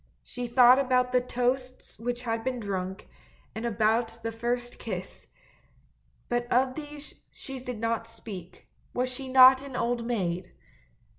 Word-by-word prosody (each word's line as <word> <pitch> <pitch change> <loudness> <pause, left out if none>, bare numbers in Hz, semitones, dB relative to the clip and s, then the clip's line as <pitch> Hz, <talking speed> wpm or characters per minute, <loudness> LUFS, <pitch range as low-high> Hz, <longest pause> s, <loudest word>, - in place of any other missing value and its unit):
She 245 0 -5
thought 250 +2 +7
about 250 -2 +2
the 250 0 +3
toasts 250 +1 -2
which 245 +1 -3
had 225 -1 -2
been 255 0 -2
drunk, 190 -2 -4 0.5
and 225 +2 -3
about 225 +1 +1
the 230 - -2
first 240 +2 -3
kiss 185 -4 -6 0.5
— - - -37
but 240 0 -2
of 255 +1 +3
these 295 0 -8 0.2
she 270 -1 -7
did 250 -2 -6
not 230 0 -1
speak, 210 -6 -10 0.3
was 250 +1 0
she 265 +1 -5
not 260 0 +8
an 275 -2 -8
old 235 0 0
maid! 185 -7 -2
240 Hz, 150 wpm, -28 LUFS, 225-255 Hz, 0.5 s, not